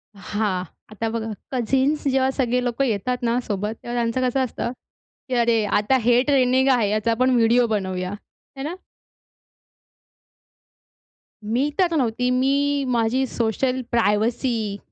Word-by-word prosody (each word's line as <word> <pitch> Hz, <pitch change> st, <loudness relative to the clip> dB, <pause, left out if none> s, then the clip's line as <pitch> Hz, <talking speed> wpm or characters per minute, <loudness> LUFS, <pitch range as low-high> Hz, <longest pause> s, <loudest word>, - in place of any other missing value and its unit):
हां, 200 Hz, -1 st, -2 dB, 0.3 s
आता 225 Hz, +2 st, -3 dB
बघा 225 Hz, 0 st, -3 dB, 0.2 s
कझिन्स 265 Hz, +4 st, +1 dB
जेव्हा 265 Hz, -1 st, +2 dB
सगळे 250 Hz, -2 st, 0 dB
लोकं 245 Hz, +2 st, 0 dB
येतात 240 Hz, +2 st, -1 dB
ना 235 Hz, +1 st, +1 dB
सोबत, 210 Hz, +1 st, -2 dB
तेव्हा 240 Hz, -, -5 dB
त्यांचं 240 Hz, +2 st, 0 dB
कसं 265 Hz, +1 st, 0 dB
असतं 235 Hz, -1 st, -3 dB, 0.6 s
की -, -, -2 dB
अरे 235 Hz, -2 st, +2 dB
आता 210 Hz, +5 st, +2 dB
हे 240 Hz, +1 st, +4 dB
ट्रेंडीग 260 Hz, -2 st, +3 dB
आहे 235 Hz, -5 st, +2 dB
याचा 215 Hz, +2 st, 0 dB
आपण 255 Hz, +3 st, +2 dB
व्हिडिओ 235 Hz, +1 st, +4 dB
बनवूया. 190 Hz, -3 st, -2 dB, 0.4 s
है 270 Hz, -, -5 dB
ना? 315 Hz, +5 st, -4 dB, 2.7 s
मी 240 Hz, +7 st, 0 dB
तर 355 Hz, -3 st, +3 dB
नव्हती, 250 Hz, -3 st, 0 dB
मी 280 Hz, +2 st, +1 dB
माझी 240 Hz, +2 st, +1 dB
सोशल 250 Hz, +3 st, -1 dB
प्रायवसी 225 Hz, -1 st, 0 dB
240 Hz, 135 wpm, -22 LUFS, 220-260 Hz, 2.7 s, हे